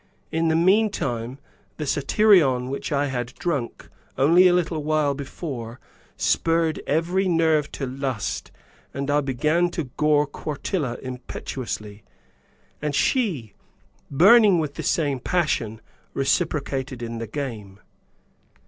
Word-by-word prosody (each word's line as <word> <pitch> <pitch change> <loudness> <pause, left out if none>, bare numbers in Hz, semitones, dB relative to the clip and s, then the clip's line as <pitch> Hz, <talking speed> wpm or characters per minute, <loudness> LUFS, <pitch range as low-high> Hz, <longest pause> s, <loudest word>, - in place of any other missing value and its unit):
In 165 +1 +1
the 160 - +2
meantime, 165 - +1 0.4
the 150 - -3
satyrion 140 -4 +3
which 140 - -4
I 145 0 +1
had 125 -3 -4
drunk 140 -9 -3 0.3
only 170 +7 +6
a 180 - +4
little 165 -3 0
while 155 -1 +1
before 130 -4 -6 0.4
spurred 165 -1 +1
every 175 +6 +1
nerve 160 -4 +2
to 135 - -3
lust 130 -4 -4 0.4
and 140 +1 -2
I 145 +1 +3
began 150 +6 +1
to 165 -7 -5
gore 150 -1 +3
Quartilla 145 -2 -3
impetuously, 125 -4 -6 0.8
and 150 -1 -2
she, 165 - 0 0.6
burning 200 - +6
with 155 -3 -2
the - - -6
same 145 -5 0
passion, 120 -9 -1 0.3
reciprocated 135 -3 -1
in 115 0 -5
the 115 - -5
game. 110 -7 -6
145 Hz, 120 wpm, -24 LUFS, 130-165 Hz, 0.8 s, only